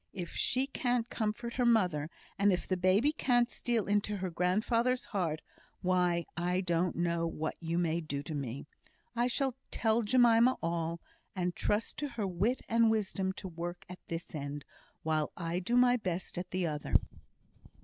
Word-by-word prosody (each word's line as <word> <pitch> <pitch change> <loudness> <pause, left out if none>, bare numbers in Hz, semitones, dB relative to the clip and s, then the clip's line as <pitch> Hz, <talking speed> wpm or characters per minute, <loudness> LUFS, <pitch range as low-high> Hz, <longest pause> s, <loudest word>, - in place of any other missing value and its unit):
If 175 -3 -5
she 260 +1 +1
can't 245 -3 0
comfort 230 +2 -2
her 250 - +1
mother, 180 -10 +3 0.3
and 200 0 +5
if 180 - -1
the 185 - +1
baby 185 +10 +3
can't 245 -5 +2
steal 235 -4 0
into 205 +1 +1
her 185 -1 -3
grandfather's 230 +8 +1
heart, 165 -7 -2 0.4
why 180 -2 +2
I 180 +2 0
don't 175 -1 0
know 170 -1 0
what 160 -1 -3
you 165 0 -2
may 170 -1 +1
do 145 -3 -4
to 155 - -6
me. 140 -2 -4 0.5
I 240 +1 +2
shall 265 +1 0 0.2
tell 225 0 +2
Jemima 240 +1 +5
all, 165 0 -1 0.3
and 180 -2 -1
trust 210 +2 -1
to 295 - -2
her 235 -5 -3
wit 195 +7 0
and 230 0 +4
wisdom 195 -3 0
to 190 - -7
work 175 0 -6
at 180 0 -9
this 170 +2 -5
end, 145 -1 -5 0.4
while 155 -1 0
I 170 0 -2
do 235 +7 +1
my 250 0 +5
best 185 -5 -3
at 180 - -5
the 185 -1 -1
other." 150 -3 -3
185 Hz, 170 wpm, -32 LUFS, 170-230 Hz, 0.5 s, and